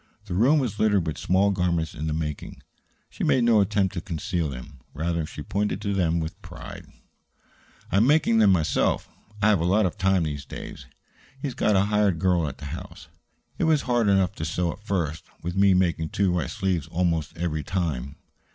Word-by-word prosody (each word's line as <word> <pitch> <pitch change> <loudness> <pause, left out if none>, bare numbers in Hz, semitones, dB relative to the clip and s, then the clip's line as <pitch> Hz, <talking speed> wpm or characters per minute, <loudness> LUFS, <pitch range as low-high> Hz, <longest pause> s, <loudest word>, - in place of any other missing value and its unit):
The 95 - -5
room 125 - +4
was 120 -8 -1
littered 105 -5 +3
with 80 -3 -4
small 95 +3 +2
garments 85 -4 0
in 75 +1 -4
the 75 - -1
making. 75 -2 -5 0.5
She - - -5
made 125 - +3
no 115 -3 +5
attempt 100 -1 +1
to - - -4
conceal 85 -3 -2
them; 65 +1 -9 0.2
rather, 85 0 -1
she 75 - -8
pointed 105 +5 -1
to 100 - -1
them 85 -3 +1
with 80 -1 -5
pride. - - -10 1.0
"I - - +2
am 110 +5 +4
making 145 -6 +4
them 105 -3 +6
myself. 85 -5 +1 0.4
I 105 - +6
have 105 -4 +4
a - - -1
lot 95 +4 +3
of 90 - -3
time 95 -2 +3
these 75 -3 -3
days. - - -9 0.5
He's 135 -2 -3
got 105 -3 +2
a 95 - +5
hired 105 -4 +2
girl 85 -2 +2
at 70 - -6
the - - -9
house. - - -9 0.5
It - - +2
was 155 -3 +3
hard 120 -3 +1
enough 95 -2 +3
to - - -4
sew 85 +2 -1
at 100 - -11
first, 85 -6 -2 0.2
with 90 +2 -3
me 100 -1 +5
making 85 -3 +1
two 95 -2 +1
right 80 -8 -1
sleeves 90 -6 -1
almost 85 -2 -1
every 80 -2 -2
time." 70 -7 -2
90 Hz, 200 wpm, -25 LUFS, 80-100 Hz, 1.0 s, them